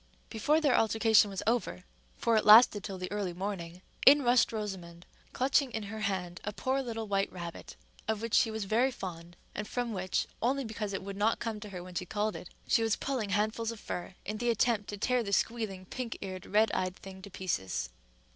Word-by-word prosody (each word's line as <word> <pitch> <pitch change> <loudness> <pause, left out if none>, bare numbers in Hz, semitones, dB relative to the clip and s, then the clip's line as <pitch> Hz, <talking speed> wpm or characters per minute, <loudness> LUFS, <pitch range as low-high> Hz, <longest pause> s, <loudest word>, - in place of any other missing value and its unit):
Before 290 +8 +2
their 290 -5 +3
altercation 220 -1 +4
was 195 -2 -4
over, 220 - 0 0.3
for 230 - +2
it 215 - +3
lasted 215 -1 +8
till 195 -2 -5
the 180 0 -5
early 200 -4 -2
morning, 180 -1 -5 0.2
in 285 +1 +8
rushed 240 -1 +4
Rosamond, 185 -6 -6 0.3
clutching 270 +1 +2
in 225 -2 -4
her 220 - -5
hand 185 -4 -3
a 210 - -3
poor 260 +5 -1
little 225 -3 -4
white 195 -1 0
rabbit, 170 -2 -8 0.3
of 220 -1 0
which 230 0 -5
she - - +5
was 220 -1 -3
very 230 +6 +2
fond, 175 -7 -8 0.2
and 210 - -4
from 245 -1 -2
which, 185 -1 -1 0.2
only 270 +4 +1
because 215 -2 -4
it 195 - -3
would 200 0 -6
not 215 +3 +2
come 225 -2 -4
to 210 - -8
her 180 -3 -7
when 180 0 -10
she 180 0 -3
called 210 +2 -1
it, 180 - -8 0.2
she - - +3
was 225 -1 +2
pulling 255 -7 -2
handfuls 215 +3 0
of 230 - -9
fur 180 -2 -6
in 210 +1 -3
the 240 0 0
attempt 225 -2 +1
to 205 - -5
tear 250 +4 +1
the 200 -3 -4
squealing, 200 -3 -1
pink 245 +4 -5
eared, 185 -2 -6
red 215 +2 +3
eyed 185 0 -1
thing 190 -1 -11
to 200 - -10
pieces. 95 - -3
210 Hz, 215 wpm, -31 LUFS, 190-230 Hz, 0.3 s, lasted